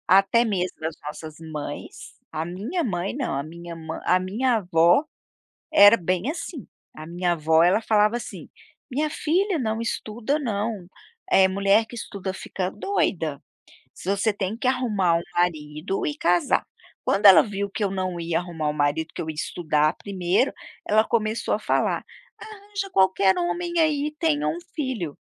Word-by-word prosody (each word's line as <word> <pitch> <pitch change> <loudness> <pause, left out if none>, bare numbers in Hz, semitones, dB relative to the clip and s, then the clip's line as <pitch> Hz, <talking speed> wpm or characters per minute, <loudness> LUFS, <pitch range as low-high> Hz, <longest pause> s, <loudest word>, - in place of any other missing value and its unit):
Até 195 +5 +5
mesmo 185 -6 -2
as 160 -1 -3
nossas 155 +1 -7
mães. 155 -3 -7 0.2
A 155 - -3
minha 215 - -3
mãe, 190 - -2
não, 270 -3 -2
a 140 - -2
minha 170 +2 -9
mãe 160 0 -6
a 180 - +4
minha 225 +7 0
avó 175 - +4 0.7
era 205 -4 +8
bem 185 - -1
assim. 330 -3 -6 0.3
A 155 - -8
minha 175 +1 0
avó, 160 0 +3
ela 180 +5 +4
falava 215 +1 +3
assim: 240 - -9 0.4
"Minha 300 +4 -1
filha, 360 +5 0
não 225 -2 -1
estuda 230 +4 -2
não. 210 - -3 0.4
Eh, 190 0 +6
mulher 200 +3 +3
que 240 - -11
estuda 200 -4 -5
fica 185 -1 -4
doida. 165 - -1 0.5
Se - - -9
você 200 +3 +2
tem 200 +1 -3
que 250 - -4
arrumar 215 -9 +1
um 170 - -1
marido 160 +1 -1
e 295 - -2
casar". 175 - +2 0.4
Quando 200 +1 +3
ela 190 -4 +10
viu 200 -1 -3
que 210 - -2
eu 200 - 0
não 185 -2 -3
ia 165 -1 -1
arrumar 170 -4 -3
um - - -2
marido, 150 +2 0
que - - -5
eu 160 - -7
ia 160 - -3
estudar 155 -1 0
primeiro, 190 +4 0 0.4
ela 215 +1 +4
começou 220 0 0
a - - 0
falar: - - 0 0.4
"Arranja 405 -2 -7
qualquer 190 - +3
homem 345 0 -1
aí 300 -2 +2
e 300 - -12
tenha 305 -3 +1
um 335 - -2 0.2
filho" 255 - -3
195 Hz, 170 wpm, -24 LUFS, 170-240 Hz, 0.7 s, ela